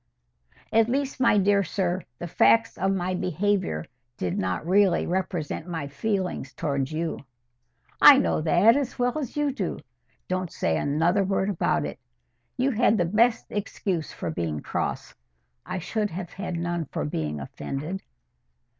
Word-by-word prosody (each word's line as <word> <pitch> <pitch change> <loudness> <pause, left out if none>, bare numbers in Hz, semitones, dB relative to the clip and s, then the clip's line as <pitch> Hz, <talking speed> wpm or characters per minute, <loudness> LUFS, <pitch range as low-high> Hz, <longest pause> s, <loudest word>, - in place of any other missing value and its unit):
"At 225 +1 +4
least, 275 +1 -1
my 240 -4 +4
dear 200 0 +3
sir, 185 0 -1 0.2
the - - -6
facts 225 +6 +3
of 195 +1 0
my 185 -1 -1
behaviour 185 - 0 0.3
did 90 -1 -2
not 95 - -2
really 190 0 +3
represent 175 -3 -2
my 165 -5 -4
feelings 185 +6 -2
towards 140 -2 -2
you." 160 +1 -2 0.8
"I 285 - +10
know 270 - +1
that 175 +9 +5
as 275 -3 -2
well 245 -1 +1
as 280 -1 -5
you 295 -1 +1
do. 200 -9 -3 0.5
Don't 185 -2 -2
say 80 - 0
another 165 - +2
word 195 +1 0
about 185 - 0
it. - - -6 0.6
You 260 +2 +2
had 225 -2 +3
the 175 - +2
best 225 +6 +2
excuse 190 -5 -3
for - - -4
being 80 - -3
cross; - - -3 0.5
I 185 +1 -3
should 210 +4 -2
have 175 0 -6
had 185 -3 -4
none 175 -1 -2
for 75 - -4
being 75 0 -3
offended." 150 - -5
185 Hz, 155 wpm, -26 LUFS, 160-210 Hz, 0.8 s, I